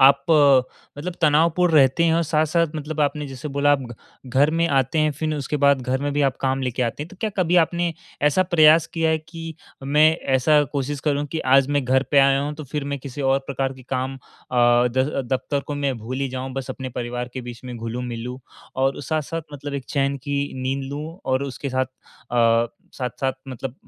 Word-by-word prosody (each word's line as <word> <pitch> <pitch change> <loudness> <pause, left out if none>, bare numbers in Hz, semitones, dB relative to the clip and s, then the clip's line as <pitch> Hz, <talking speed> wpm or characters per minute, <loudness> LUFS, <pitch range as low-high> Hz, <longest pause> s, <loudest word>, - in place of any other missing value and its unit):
आप 140 +3 +5
अ, 140 -4 +6 0.4
मतलब 175 +4 -4
तनावपूर्ण 165 +3 +3
रहते 140 +3 +5
हैं? 160 - +3
और 170 - +2
साथ-साथ 160 +1 +1
मतलब 155 +1 -4
आपने 150 0 0
जैसे 135 +2 -7
बोला 145 +1 +2
आप 140 - +2
घ 120 -2 -8 0.4
घर 135 +4 +3
में 165 +1 +1
आते 135 +3 +1
हैं 155 0 +3
फिर 155 -1 -1
उसके 150 0 -2
बाद 140 -2 +5
घर 130 +1 -1
में 145 0 -1
भी 145 - +1
आप 135 - -7
काम 135 0 0
लेके 125 0 -1
आते 120 +4 -2
हैं, 155 - -8
तो 195 - -14
क्या 220 -2 -1
कभी 180 -1 +2
आपने 170 0 +2 0.3
ऐसा 165 +6 +4
प्रयास 160 -2 +5
किया 165 -1 +2
है 160 - +2
कि 165 0 -9 0.3
मैं 150 +3 +5 0.3
ऐसा 150 +3 +4
कोशिश 140 0 -2
करूँ 145 -1 0
कि 160 - -1
आज 135 0 +5
मैं 140 - +1
घर 130 +1 +3
पे 145 - +5
आया 135 0 +5
हूँ 145 +1 -3
तो 155 - -8
फिर 150 -2 -2
मैं 140 - -2
किसी 140 +1 -7
और 135 0 +3
प्रकार 135 -1 -2
के 130 -1 -14
काम 130 +1 -2
अ, - - -14 0.3
द 125 +3 +3
दफ्तर 140 +2 -1
को 145 - -3
मैं 140 -2 -1
भूल 120 +4 -5
ही 135 - 0
जाऊँ 130 +1 -5
बस 135 -1 -4
अपने 130 -1 -5
परिवार 120 0 -3
के 130 - -3
बीच 120 -1 -9
में 125 -1 -6
घुलूँ-मिलूँ, 120 +1 -5 0.4
और 135 +1 +1
साथ-साथ 155 +3 -2
मतलब 145 0 -6
एक 135 - -4
चैन 140 -1 0
की 140 0 0 0.2
नींद 135 +1 -1
लूँ 155 +5 -6
और 130 +1 0
उसके 140 0 -5
साथ 130 +1 +1
अ, 120 -2 0 0.3
साथ-साथ 130 +1 -2 0.2
मतलब 130 0 -6
140 Hz, 215 wpm, -22 LUFS, 130-155 Hz, 0.4 s, अ